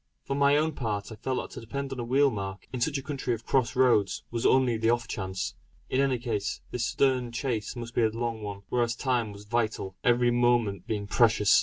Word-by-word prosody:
For 135 - -3
my 140 +1 +4
own 155 +1 +2
part, 110 -7 -3
I - - -6
felt 130 +4 -2
that - - -6
to - - -7
depend 135 +4 -4
on 130 - -7
a - - -2
wheel 135 +4 +3
mark, 100 -2 -5
in 125 - -3
such 145 +3 +1
a 135 - -5
country 135 -4 -2
of 115 - -13
cross 130 -4 +1
roads, 120 -6 +3
was 115 -1 +1
only 130 -3 +4
the 115 0 +1
off 120 0 +1
chance. 95 -2 -3 0.4
In 130 - +3
any 135 -2 +2
case, 115 -4 -2
this 125 0 -1
stern 130 -3 +1
chase 120 -3 -2
must 120 -1 -6
be - - +2
a 110 - +4
long 115 0 -3
one; 100 -1 -6
whereas 120 -1 +1
time 120 -4 0
was 100 0 -11
vital, 110 -4 -1
every 120 0 +4
moment 120 -6 +2
being 105 -2 -2
precious. 110 -1 +4
120 Hz, 225 wpm, -28 LUFS, 110-130 Hz, 0.4 s, my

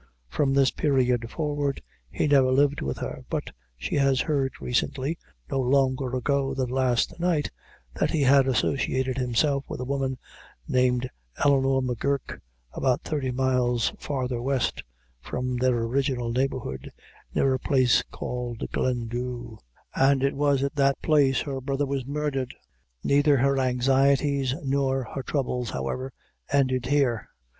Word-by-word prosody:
From 135 - +1
this 135 -2 +4
period 125 -5 +1
forward 145 -2 -2 0.3
he - - -1
never 135 -3 +4
lived 145 +2 +2
with 70 -1 -3
her, - - -5
but - - -3 0.3
she 60 - -2
has 135 -2 +3
heard 140 -4 0
recently 135 +5 -1 0.3
no 135 - 0
longer 130 0 +1
ago 135 +1 0
than 130 -2 -1
last 130 +4 +1
night 170 -4 0 0.4
that - - 0
he 155 -3 +1
had 135 0 +5
associated 130 +1 0
himself 135 +3 +1
with - - -5
a 125 - -3
woman 135 -1 -1 0.5
named 125 0 +2 0.4
Eleanor 135 -1 +3
M'Guirk, 130 +2 -2 0.3
about 130 -2 0
thirty 145 -4 -2
miles 125 -2 +1
farther 130 -4 -2
west 130 -1 0 0.4
from 125 - -3
their 125 -1 +2
original 125 -1 -1
neighborhood, 125 - -2 0.4
near 135 -1 +3
a 130 - -1
place 130 -2 +3
called 125 -2 -5
Glendhu, 120 -1 -3 0.3
and 135 0 +3
it 140 - +2
was 140 -1 +2
at 140 - -1
that 140 -1 +3
place 145 -4 +3
her 135 -3 -4
brother 135 +2 -1
was 135 -2 -3
murdered. 140 -3 -2 0.5
Neither 145 0 +4
her 135 +1 +2
anxieties 135 +1 +2
nor 135 -1 0
her 135 - -3
troubles, 125 -4 -2
however, 130 - -3 0.4
ended 130 -3 +1
here. 135 -6 +1
135 Hz, 140 wpm, -26 LUFS, 125-140 Hz, 0.5 s, had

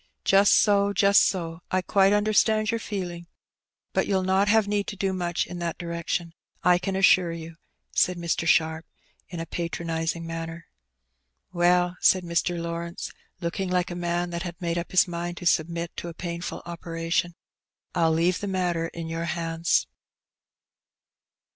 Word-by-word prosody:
^^ - - -52
Just 195 +1 +5
so, 200 -1 +4
just 200 +1 +5
so. 165 -2 -2
I 185 0 0
quite 195 +1 +4
understand 215 +1 +3
your 230 - -1
feeUng. 175 -5 -5 0.7
But - - +1
you'll 190 -2 +1
not 190 +2 +2
have 215 0 +4
need 205 -1 0
to - - -4
do 195 0 -1
much 175 -2 -1
in 180 - -7
that 170 -1 -3
direction, 170 0 -3 0.3
I 180 0 +5
can 195 +1 -3
assure 185 -2 +4
you,'* 165 0 -8 0.3
said 180 -1 +2
Mr. 170 -1 -1
Sharp, 160 -1 +2 0.4
in 175 - -6
a 165 - -3
patronizing 165 0 -3
manner. 165 0 -6 0.9
"Well," 175 0 +3
said 185 -1 +4
Mr. 170 0 -1
Lawrence, 170 0 -5 0.3
looking 180 +2 -2
like 180 -1 0
a - - -4
man 175 0 -1
that 170 0 -3
had 175 -2 -6
made 170 -1 -1
up 170 - -6
his 185 - +4
mind 175 0 -4
to - - -8
submit 170 +1 0
to - - -5
a 170 - -7
painful 170 -1 -5
operation, 170 0 -2
'^ - - -26 0.6
I'll 165 -2 +3
leave 170 +3 +2
the 205 - -4
matter 175 -3 0
in 165 -1 -7
your 165 +1 -3
hands." 165 0 0
175 Hz, 165 wpm, -26 LUFS, 170-185 Hz, 0.9 s, Just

